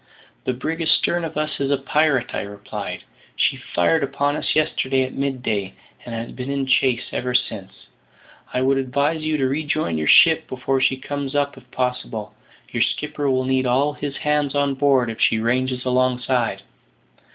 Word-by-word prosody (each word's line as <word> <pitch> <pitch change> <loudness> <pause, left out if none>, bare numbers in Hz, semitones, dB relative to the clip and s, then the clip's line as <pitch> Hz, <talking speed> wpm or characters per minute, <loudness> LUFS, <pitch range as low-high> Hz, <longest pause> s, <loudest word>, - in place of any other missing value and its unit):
"The 130 - 0
brig 160 +7 -3
astern 170 +1 +1
of 160 -2 -5
us 155 0 -2
is 140 -1 0
a 140 - +3
pirate," 140 -2 +1
I - - -1
replied; 100 0 -6 0.3
"she - - +2
fired 140 - +1
upon 140 +1 0
us - - -2
yesterday 135 -3 +1
at 130 - -5
mid 135 -2 -2
day, 100 -4 -2 0.3
and 120 - -6
has 115 +1 -5
been 130 +1 -6
in 140 -1 -1
chase 130 -2 +2
ever 125 0 -2
since. 100 -6 -3 0.7
I 125 - 0
would 135 +1 +3
advise 140 +5 0
you 155 0 0
to 135 -2 +1
rejoin 145 - -1
your 75 - -2
ship 160 -1 +6
before 130 +1 -1
she 130 0 +3
comes 140 +1 -4
up 145 0 +1
if 130 -2 -16
possible. 125 -4 -3 0.4
Your - - -1
skipper 150 -1 0
will 130 -1 +1
need 130 0 +1
all 135 +4 +2
his 145 -1 -5
hands 150 -2 0
on 140 -1 +2
board 135 -4 +2
if 110 - -8
she 110 - +4
ranges 125 +3 0
alongside." 125 -1 +1
130 Hz, 180 wpm, -22 LUFS, 125-145 Hz, 0.7 s, ship